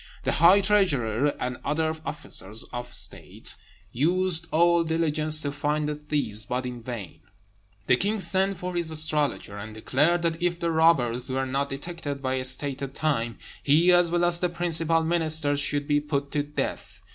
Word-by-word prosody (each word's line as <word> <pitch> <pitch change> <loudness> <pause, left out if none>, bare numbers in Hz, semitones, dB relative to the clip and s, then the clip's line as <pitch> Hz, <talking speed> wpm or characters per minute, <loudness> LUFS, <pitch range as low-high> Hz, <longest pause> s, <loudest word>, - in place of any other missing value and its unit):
The - - 0
high 180 +6 +5
treasurer 145 - +1
and 125 0 -3
other 160 +2 -1
officers 115 -8 -1
of 120 0 -6
state - - -2 0.4
used 170 +4 0
all 170 +1 +3
diligence 155 -1 +2
to 145 - -1
find 150 +1 -1
the 150 - -1
thieves, 145 -8 -2
but 125 +4 -3
in 125 -1 -6
vain. 110 -9 -7 0.7
The 125 - +3
king 210 +6 0
sent 190 0 +2
for 180 +1 -5
his 170 -2 0
astrologer, 150 -9 -1
and 110 +1 -9
declared 150 +10 +1
that 165 0 -1
if 175 -1 -1
the 170 -1 -1
robbers 130 -7 +2
were 135 +1 -1
not 135 +2 -2
detected 145 0 -6
by 130 -1 -2
a 130 -1 -2
stated 135 +1 +1
time, 120 -7 -1 0.2
he, 160 +5 +4
as 175 -1 +4
well 175 +1 +1
as 175 0 +2
the 180 - 0
principal 165 -1 +1
ministers, 160 -3 +2
should 145 0 0
be 145 -1 +2
put 140 -1 -3
to 145 - 0
death. 145 +1 -5
150 Hz, 170 wpm, -25 LUFS, 130-170 Hz, 0.7 s, high